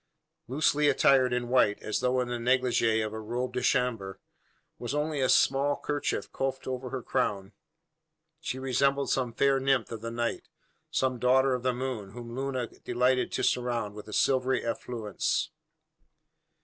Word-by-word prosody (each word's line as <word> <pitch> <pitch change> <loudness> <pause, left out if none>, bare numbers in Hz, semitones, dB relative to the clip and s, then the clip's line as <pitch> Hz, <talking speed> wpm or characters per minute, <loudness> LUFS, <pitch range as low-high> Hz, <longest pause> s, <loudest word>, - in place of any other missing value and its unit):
Loosely 145 +3 +2
attired 130 -2 +4
in 125 0 -1
white, 120 -5 +3
as 110 - -1
though 125 0 +1
in 125 - -2
the 120 -1 -3
neglige 120 -3 +2
of 105 - -5
a 110 - -5
robe 120 +3 -3
de 125 - -1
chambre, 120 -6 0 0.6
with 125 +4 -3
only 150 -1 -1
a 130 - +2
small 140 +2 +3
kerchief 145 -1 -3
coifed 135 0 -3
over 130 0 -4
her 130 -2 -5
crown, 100 0 -1 0.9
she 160 -5 -4
resembled 135 +2 +1
some 125 -3 0
fair 135 +3 +2
nymph 135 -3 +1
of 115 -2 -6
the 115 - -4
night, 115 0 -3 0.4
some 130 -2 0
daughter 130 +2 +4
of 125 - -2
the 130 +1 +1
moon, 120 -6 -4
whom 120 0 -8
Luna 130 -2 -2
delighted 125 +2 0
to - - -1
surround 120 -4 0
with 105 0 -10
a 105 - -8
silvery 130 +1 +2
effulgence! 115 -2 -2
125 Hz, 160 wpm, -28 LUFS, 115-130 Hz, 0.9 s, attired